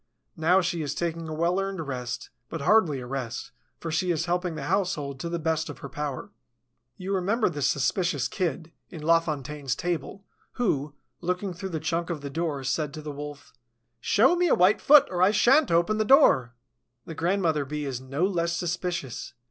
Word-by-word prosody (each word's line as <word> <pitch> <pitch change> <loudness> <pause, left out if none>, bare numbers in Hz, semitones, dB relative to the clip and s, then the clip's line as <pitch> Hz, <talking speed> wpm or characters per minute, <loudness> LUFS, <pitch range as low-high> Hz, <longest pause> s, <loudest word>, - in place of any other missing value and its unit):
Now 175 +4 +3
she 175 -2 -1
is 145 -1 -3
taking 165 -1 -3
a - - -4
well 170 +4 +1
earned 195 -5 -3
rest, 125 -2 -5 0.2
but 165 - -5
hardly 165 -5 +3
a - - -7
rest, 125 -2 -5 0.3
for 165 - -5
she 180 +3 0
is 165 -3 0
helping 175 -1 -1
the - - -5
household 170 -8 -1
to 170 - -4
the 170 - -2
best 160 -1 -1
of - - -7
her 140 - -8
power. 145 -1 -5 0.7
You 190 +2 -3
remember 200 +4 +1
the 145 -4 -5
suspicious 145 +1 +1
Kid, 165 -2 -3 0.2
in 160 -4 -9
La 165 +1 +5
Fontaine's 150 -4 -4
fable, 175 +4 -4 0.3
who, 150 - -1 0.2
looking 180 +2 -2
through 190 +2 -6
the 165 -3 -3
chink 170 +2 -2
of 165 -4 -3
the 140 -1 -6
door, 155 -3 -2
said 145 +3 -1
to 155 - -7
the 150 - -5
Wolf: 145 0 -9 0.5
"Show 235 - +4
me 355 0 +2
a - - +4
white 185 +4 +4
foot, 295 0 +7
or 180 -1 -1
I 185 - +6
shan't 265 +7 +4
open 170 +6 +2
the - - +3
door." 135 - +5 0.5
The 165 - -7
grandmother 165 -2 +1
Bee 150 +2 -4
is 130 -2 -4
no 140 +6 -1
less 170 -3 0
suspicious. 170 -8 -3
165 Hz, 195 wpm, -26 LUFS, 145-185 Hz, 0.7 s, foot